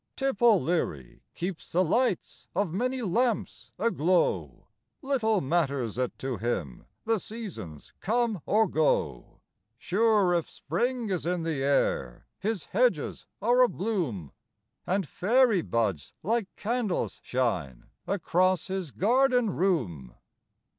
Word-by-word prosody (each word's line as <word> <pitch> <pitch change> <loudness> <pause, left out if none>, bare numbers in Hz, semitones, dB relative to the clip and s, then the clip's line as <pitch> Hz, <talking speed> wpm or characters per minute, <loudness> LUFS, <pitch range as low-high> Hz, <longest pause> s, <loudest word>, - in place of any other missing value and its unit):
Tip 270 -5 -2
O'Leary 175 - +2
keeps 180 -1 -5
the 180 +2 +4
lights 200 +3 0
of 195 -6 0
many 255 +5 -1
lamps 230 +4 -1
aglow, 185 -5 +1 0.4
Little 225 -7 +1
matters 135 - 0
it 125 -1 -2
to 130 -3 -3
him 95 - -3 0.2
the 225 -1 +2
seasons 165 - -8
come 225 -3 0
or 220 +1 +4
go, 155 - 0 0.4
Sure 205 - +2
if 170 -2 0
spring 235 - -2
is 180 -3 -2
in 175 -1 0
the 160 -4 -2
air 100 - 0
his 215 -2 -2
hedges - - 0 0.2
are - - +4
abloom, 170 - 0 0.6
And 190 -2 0
fairy 225 - +3
buds 105 - -1
like 225 0 0
candles 220 -3 -2
shine 90 - -1 0.2
across 185 -1 +1
his 190 -4 -3
garden 245 - +2
room. 115 - -1
185 Hz, 115 wpm, -28 LUFS, 135-225 Hz, 0.6 s, the